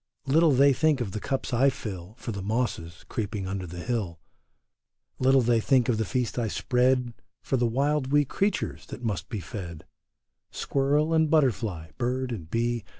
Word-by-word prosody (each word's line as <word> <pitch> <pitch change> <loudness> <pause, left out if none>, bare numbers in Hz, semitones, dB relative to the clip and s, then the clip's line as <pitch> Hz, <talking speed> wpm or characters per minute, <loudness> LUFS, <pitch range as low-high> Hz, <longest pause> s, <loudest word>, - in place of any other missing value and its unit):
Little 155 +4 +4
they 140 +1 +5
think 155 +1 +2
of 115 -6 -3
the 110 - -4
cups 135 +2 -3
I 130 +4 +5
fill 105 -7 -7
For 120 - -5
the 100 -2 -5
mosses 100 -6 -3
creeping 105 -3 -3
under 95 -1 -4
the 90 +1 -7
hill; 105 -9 -2 1.0
Little 135 +1 +5
they 120 -1 +3
think 125 +1 +3
of 110 -3 +1
the 110 - +1
feast 125 0 -1
I 115 - 0
spread 125 +2 +1 0.3
For - - 0
the 120 -2 +2
wild 135 +3 0
wee 145 0 +4
creatures 195 +9 -2
that 125 - -8
must 105 -4 -3
be 110 - -3
fed: 85 -3 -7 0.6
Squirrel 145 +3 +1
and 160 -1 +3
butterfly, 110 - +1
bird 125 +1 -1
and 85 -9 -6
bee. 120 +1 0
120 Hz, 175 wpm, -27 LUFS, 105-135 Hz, 1.0 s, they